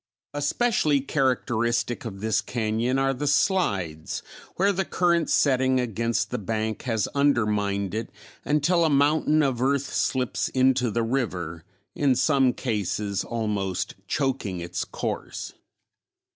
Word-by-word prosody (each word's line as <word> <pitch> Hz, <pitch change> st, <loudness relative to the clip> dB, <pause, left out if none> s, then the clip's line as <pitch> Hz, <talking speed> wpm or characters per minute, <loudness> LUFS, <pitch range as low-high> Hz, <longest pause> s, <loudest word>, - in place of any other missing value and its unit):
Especially 145 Hz, 0 st, +1 dB
characteristic 120 Hz, -3 st, 0 dB
of 100 Hz, -3 st, -6 dB
this 110 Hz, -1 st, +1 dB
cañon 115 Hz, +2 st, -1 dB
are 135 Hz, 0 st, +2 dB
the 145 Hz, +3 st, -3 dB
slides 100 Hz, -, 0 dB, 0.3 s
where 195 Hz, +3 st, +3 dB
the 190 Hz, 0 st, 0 dB
current 170 Hz, -2 st, +1 dB
setting 130 Hz, -2 st, +3 dB
against 115 Hz, -3 st, -1 dB
the -, -, -2 dB
bank 110 Hz, +1 st, -2 dB
has 110 Hz, -5 st, 0 dB
undermined 105 Hz, -8 st, +1 dB
it 110 Hz, +1 st, -3 dB, 0.3 s
until 160 Hz, +4 st, +2 dB
a 160 Hz, -, +3 dB
mountain 150 Hz, +2 st, +3 dB
of 130 Hz, -4 st, 0 dB
earth 140 Hz, +1 st, 0 dB
slips 130 Hz, -3 st, 0 dB
into 130 Hz, -1 st, +2 dB
the 115 Hz, +2 st, 0 dB
river, 95 Hz, -10 st, -2 dB, 0.3 s
in 140 Hz, -3 st, +2 dB
some 135 Hz, -2 st, +3 dB
cases 105 Hz, -4 st, -2 dB
almost 105 Hz, -5 st, -2 dB
choking 130 Hz, -9 st, -1 dB
its 85 Hz, +1 st, -4 dB
course. -, -, -5 dB
125 Hz, 125 wpm, -25 LUFS, 105-140 Hz, 0.3 s, where